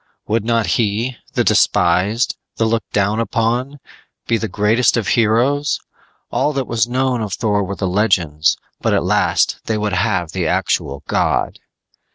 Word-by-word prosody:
Would 110 0 0
not 115 -1 +1
he, 115 +3 0 0.2
the - - +2
despised, 90 +8 +2 0.2
the 115 - 0
looked 110 -1 -1
down 105 +2 +1
upon, 115 +5 -1 0.5
be 115 - +1
the 110 - -2
greatest 110 +4 +2
of 110 -5 -1
heroes? 125 +6 +2 0.5
All 150 - +1
that 135 -2 -1
was 115 -1 0
known 130 -1 0
of 105 -3 -4
Thor 105 -2 0
were 100 +1 -4
the 95 - -2
legends, 90 -6 +1 0.2
but - - +1
at - - +1
last - - +1
they 110 - -1
would 105 -1 -2
have 90 -3 0
the 90 -2 -2
actual 70 -2 -1
god! - - 0
110 Hz, 160 wpm, -18 LUFS, 100-120 Hz, 0.5 s, the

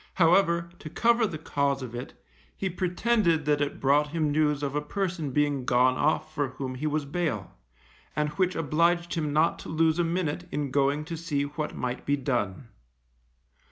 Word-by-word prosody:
However, 170 -1 +3
to 155 - -8
cover 235 +5 +3
the 160 - -5
cause 140 -3 -1
of 120 -2 -7
it, 120 +2 -7 0.4
he 190 -1 -2
pretended 180 -2 +1
that 150 0 +2
it 145 - -2
brought 145 +2 +3
him 155 -1 -1
news 150 -1 +1
of 140 -1 -2
a 150 - +1
person 170 -1 -2
being 145 -1 +1
gone 125 +1 +3
off 155 +2 0
for 145 -2 0
whom 130 0 -5
he 135 +4 -3
was 150 -1 -1
bail, 140 - -2 0.6
and 150 0 +1
which 180 +4 0
obliged 170 +3 +1
him 155 -3 -1
not 155 +3 +2
to - - -9
lose 160 +1 +2
a - - +4
minute 170 0 -2
in 145 -2 -2
going 140 +2 +1
to 165 +1 -5
see 155 -3 -1
what 150 +1 -4
might 125 0 -3
be 145 0 +1
done. 120 -5 -2
150 Hz, 185 wpm, -27 LUFS, 140-170 Hz, 0.6 s, a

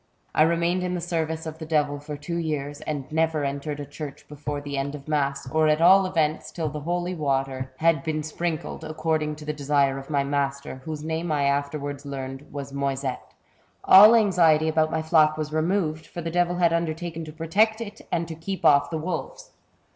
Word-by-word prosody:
I - - +3
remained 170 +3 +2
in 180 0 -2
the - - -2
service 160 -1 -2
of 160 0 -7
the 160 - -6
devil 145 -2 +1
for 150 0 -7
two 170 +4 -4
years, 145 -3 -3
and 145 -3 -3
never 160 -2 +1
entered 140 +1 -3
a 145 - -5
church 145 0 -8
before 145 0 -5
the 145 0 -6
end 140 +1 -2
of 140 0 -11
mass, 140 -3 -1
or 155 +1 +3
at 150 0 +3
all 190 +3 +6
events 160 -4 0
till 160 -3 -2
the 150 +1 -5
holy 175 +4 -2
water 135 -4 0
had 130 - -5
A - - -6
CHAPTER 130 - -5
OF 130 +4 -15
HORRORS. 165 -4 +4
71 155 +2 -2
been 155 - -2 0.4
sprinkled, - - -8
according 155 -1 -1
to 150 0 -11
the 150 - -2
desire 140 -2 +1
of 135 - -11
my 140 -2 +1
master^ 140 -1 -2
whose 155 +1 -6
name 160 +1 -2
I 145 -2 +1
afterwards 140 0 -1
learned 135 0 -6
was 140 -1 -6
Moyset. 135 -2 -2 0.4
" - - -38
All 210 +4 +11
anxiety 170 -8 +4
about 155 0 +2
my 160 0 -1
flock 155 -1 +4
was 155 0 -4
removed, 160 -1 0
for 175 - -7
the 165 - -3
devil 175 +1 +1
had 170 -2 +3
undertaken 165 0 -2
to 155 - -8
protect 200 +8 +1
it 210 -3 -7
and 170 -1 0
to 165 - -6
keep 185 +4 -5
off 145 -1 +5
the 160 - -2
wolves. 185 - -5
155 Hz, 220 wpm, -25 LUFS, 145-165 Hz, 0.4 s, All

